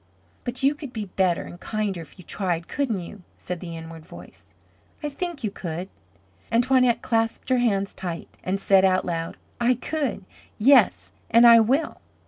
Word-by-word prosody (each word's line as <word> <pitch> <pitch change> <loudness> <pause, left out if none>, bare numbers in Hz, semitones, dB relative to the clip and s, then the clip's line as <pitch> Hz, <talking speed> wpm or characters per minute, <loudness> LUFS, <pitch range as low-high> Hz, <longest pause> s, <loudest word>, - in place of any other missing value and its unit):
"But 245 +2 -4
you 275 +2 +4
could 285 -4 -9
be 215 -2 -4
better 185 -2 0
and 175 - -11
kinder 210 -5 -2
if 165 - -14
you 180 - -13
tried, 175 -4 -2
couldn't 245 -9 -1
you?" 195 +3 -10 0.2
said 180 -1 -5
the 170 -2 -7
inward 165 0 -9
voice. 165 - -14 0.5
"I 295 - -1
think 335 -1 -5
you 210 - -1
could." 175 0 -5 0.6
And 230 +1 +3
Toinette 255 -2 +3
clasped 225 +1 -1
her 255 -1 +3
hands 200 -5 +1
tight 175 -3 -6
and 190 +2 -1
said 195 -1 +4
out 185 -1 +3
loud: 165 -1 -3 0.2
"I 240 +1 +3
could. 265 -6 -3 0.3
Yes 270 +6 +4 0.2
and 230 +1 +6
I 235 -1 +9
will." 260 +8 +1
210 Hz, 175 wpm, -24 LUFS, 180-250 Hz, 0.6 s, I